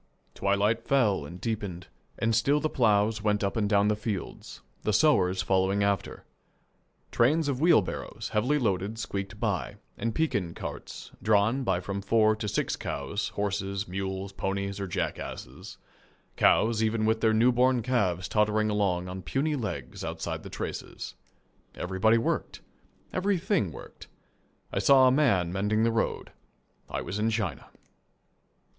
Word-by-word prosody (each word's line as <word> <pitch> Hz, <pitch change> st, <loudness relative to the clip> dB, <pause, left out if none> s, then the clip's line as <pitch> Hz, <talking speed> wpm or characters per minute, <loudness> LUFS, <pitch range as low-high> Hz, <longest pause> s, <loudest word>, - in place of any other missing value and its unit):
Twilight 100 Hz, +3 st, +1 dB
fell 110 Hz, -, +2 dB
and 85 Hz, +3 st, -10 dB
deepened, 100 Hz, -6 st, -4 dB, 0.3 s
and 115 Hz, 0 st, +1 dB
still 140 Hz, +6 st, +3 dB
the 155 Hz, 0 st, -1 dB
ploughs 105 Hz, -2 st, +2 dB
went 105 Hz, 0 st, +1 dB
up 100 Hz, -, -1 dB
and 105 Hz, -3 st, 0 dB
down 100 Hz, -1 st, +4 dB
the 105 Hz, -, +2 dB
fields, 105 Hz, -3 st, -5 dB, 0.2 s
the 105 Hz, -, 0 dB
sowers 95 Hz, -9 st, +3 dB
following 95 Hz, +2 st, +2 dB
after. 100 Hz, -2 st, -1 dB, 0.9 s
Trains 150 Hz, +6 st, +3 dB
of 135 Hz, -1 st, -1 dB
wheelbarrows, 160 Hz, -, +1 dB
heavily 125 Hz, +8 st, +2 dB
loaded, 105 Hz, -3 st, -1 dB
squeaked 100 Hz, -2 st, -5 dB
by, 95 Hz, -, -1 dB, 0.2 s
and 115 Hz, +1 st, -2 dB
Pekin 100 Hz, -, -1 dB
carts, -, -, -7 dB
drawn 110 Hz, +5 st, +2 dB
by 95 Hz, -6 st, +1 dB
from 100 Hz, +2 st, -4 dB
four 110 Hz, +1 st, +3 dB
to 110 Hz, -, -4 dB
six -, -, -1 dB
cows, 100 Hz, 0 st, -3 dB
horses, 100 Hz, -1 st, -2 dB
mules, 95 Hz, +1 st, -4 dB
ponies, 100 Hz, 0 st, -3 dB
or 100 Hz, -, -3 dB
jackasses -, -, -5 dB, 0.6 s
cows 110 Hz, 0 st, +3 dB
even 110 Hz, 0 st, +1 dB
with 110 Hz, 0 st, +1 dB
their 110 Hz, -, +4 dB
newborn 125 Hz, +2 st, +3 dB
calves 95 Hz, -8 st, 0 dB
tottering 105 Hz, 0 st, +2 dB
along 95 Hz, -4 st, 0 dB
on 95 Hz, +1 st, -6 dB
puny 150 Hz, +9 st, -1 dB
legs 75 Hz, -, -5 dB
outside -, -, -4 dB
the -, -, -9 dB
traces. -, -, -6 dB, 0.6 s
Everybody 95 Hz, +5 st, +2 dB
worked. 115 Hz, -, -2 dB, 0.5 s
Everything 185 Hz, -, +1 dB
worked. -, -, -12 dB, 0.7 s
I -, -, +1 dB
saw 135 Hz, -2 st, +6 dB
a -, -, +5 dB
man 100 Hz, -, +2 dB
mending 105 Hz, +3 st, +1 dB
the 115 Hz, -, +3 dB
road. 115 Hz, 0 st, -1 dB, 0.6 s
I -, -, -3 dB
was 95 Hz, +4 st, -4 dB
in 110 Hz, +1 st, +2 dB
China. 105 Hz, -4 st, -3 dB
105 Hz, 145 wpm, -28 LUFS, 95-115 Hz, 0.9 s, saw